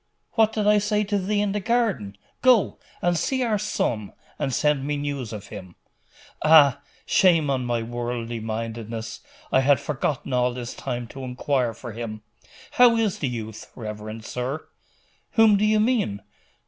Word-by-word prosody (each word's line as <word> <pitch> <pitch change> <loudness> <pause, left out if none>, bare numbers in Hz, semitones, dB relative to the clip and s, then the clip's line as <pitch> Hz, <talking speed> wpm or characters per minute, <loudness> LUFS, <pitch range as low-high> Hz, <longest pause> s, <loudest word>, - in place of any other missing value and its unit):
'What 220 -1 +3
did 215 -2 -1
I 210 0 +5
say 210 0 +1
to 205 0 0
thee 205 +2 0
in 205 -1 0
the 210 - -1
garden? 200 - 0 0.2
Go, 250 -5 +4 0.2
and 175 0 +2
see 260 - 0
our 220 -4 +1
son, 115 - -2 0.3
and 135 - -1
send 150 0 +1
me 145 +1 -1
news 140 -5 -3
of 105 -3 -8
him.' 95 -4 -9 0.7
'Ah! 145 -4 +7 0.3
shame 165 -6 +4
on 130 -2 -1
my 120 -1 -1
worldly 120 0 -4
mindedness! 110 0 -5 0.3
I - - +5
had 140 +1 +4
forgotten 140 -2 -2
all 125 0 +1
this 120 -1 -5
time 120 0 -4
to 135 +1 -8
inquire 125 -2 -1
for 120 +1 -8
him. 110 -1 -6 0.5
How 245 -5 +6
is 220 -4 0
the 145 - -1
youth, 110 -2 -7
reverend 110 0 -7
sir?' 130 +5 -4 0.7
'Whom 225 -2 +6
do 205 +1 +2
you 215 0 +3
mean? 210 - +1
135 Hz, 165 wpm, -24 LUFS, -, 0.7 s, Ah